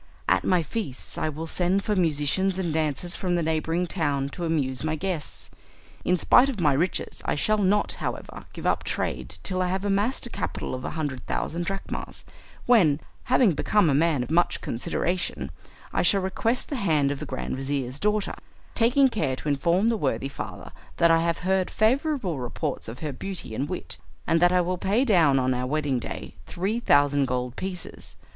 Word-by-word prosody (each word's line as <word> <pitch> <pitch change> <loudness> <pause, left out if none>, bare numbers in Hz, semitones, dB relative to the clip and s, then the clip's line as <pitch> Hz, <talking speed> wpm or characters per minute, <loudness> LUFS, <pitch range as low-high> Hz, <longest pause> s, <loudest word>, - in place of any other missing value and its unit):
At - - +3
my 180 -3 +3
feasts 145 - -5
I 155 - -1
will 155 +2 -5
send 180 +4 +1
for 210 - 0
musicians 175 +2 +1
and 175 -4 -1
dancers 160 +2 -1
from 180 -2 -1
the 170 - +1
neighbouring 160 +2 0
town 145 -6 -1
to 175 +4 -5
amuse 140 -6 0
my 155 0 0
guests. 175 -2 -4 0.5
In 180 - +2
spite 250 +9 +5
of 245 -7 -4
my 150 -5 +4
riches 170 +7 -1
I - - +1
shall 215 +9 +1
not, 205 +1 +2
however, - - -5
give - - -8
up - - +2
trade - - -3
till 185 -1 -1
I 180 - +1
have 190 +2 -2
amassed 205 +7 +1
a 240 - -8
capital - - -3
of 130 0 -4
a - - -2
hundred 140 -5 -2
thousand 170 +1 -2
drachmas, 195 0 -5 0.4
when, 175 -12 +5 0.3
having 250 -5 +4
become 170 +2 +2
a - - +2
man 150 -2 +2
of 125 - -7
much 175 +2 +2
consideration, 170 +7 -2 0.4
I - - +2
shall 200 -2 +3
request 225 +6 -1
the 285 - -2
hand 155 - +2
of 140 - -4
the 150 - -6
grand 130 - -3
vizir's 135 -1 -3
daughter, 210 0 0 0.4
taking 250 +4 +4
care 215 - -1
to 150 - -4
inform 170 +9 +2
the 230 - +1
worthy 135 - -1
father 140 - -7 0.3
that 170 0 +5
I 165 - +5
have 170 0 0
heard 190 0 +2
favourable 230 - +1
reports 130 +4 -3
of 115 +3 -8
her 150 -3 -3
beauty 185 - -6
and 135 +7 -2
wit, 180 - -5 0.3
and 165 - +3
that 175 0 +6
I 180 0 +4
will 180 +1 -2
pay 215 +9 +2
down 165 - +4
on 130 0 +2
our 125 0 -2
wedding 145 -2 0
day - - -6
3 200 +6 -1
thousand 145 - +4
gold 125 0 -2
pieces. 185 -2 -6
170 Hz, 195 wpm, -26 LUFS, 145-195 Hz, 0.5 s, that